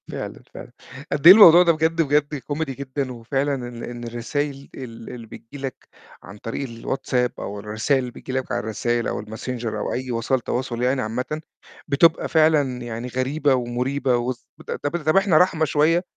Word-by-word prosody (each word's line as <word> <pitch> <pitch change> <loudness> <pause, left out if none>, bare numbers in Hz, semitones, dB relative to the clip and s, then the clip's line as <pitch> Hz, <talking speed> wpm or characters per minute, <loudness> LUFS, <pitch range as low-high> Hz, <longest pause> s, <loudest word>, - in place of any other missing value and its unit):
فعلًا، - - -6
فعلًا، - - -10 0.4
قد 150 +3 +3
إيه 185 - +14
الموضوع 180 -4 +9
ده 170 - +4
بجد، 165 +1 +1
بجد 150 0 +1
كوميدي 145 +1 -4
جدًا 135 0 -4
وفعلًا 135 +4 -1
إن 120 -2 -7
إن 120 0 -7
الرسايل 135 +4 -4
ال 115 -4 -9
اللي 120 -2 -9
بتيجي 115 +6 -11
لك 135 - -3 0.5
عن 100 +3 -11
طريق 120 +5 -5
الواتساب 125 +1 -1
أو 100 +1 -5
الرسايل 110 +6 0
اللي 125 -1 -4
بتيجي 130 - -9
لك 130 0 -3
على - - 0
الرسايل 120 +2 -1
أو - - -3
الmessenger 115 +3 -6
أو 105 - -3
أي 130 0 -3
وسائل 120 +3 0
تواصل 120 0 -3
يعني 130 +1 +1
عامةً، 125 +7 -3 0.5
بتبقى 160 +3 +3
فعلًا 150 -6 +3
يعني 120 0 -5
غريبة 135 +3 +1
ومريبة، 125 +1 0
وس 120 +1 -4 0.4
طب 145 - 0
طَب 155 +5 +3
إحنا 195 -5 +4
رحمة 170 -2 +3
شوية، 160 +4 +2
130 Hz, 175 wpm, -23 LUFS, 120-145 Hz, 0.5 s, إيه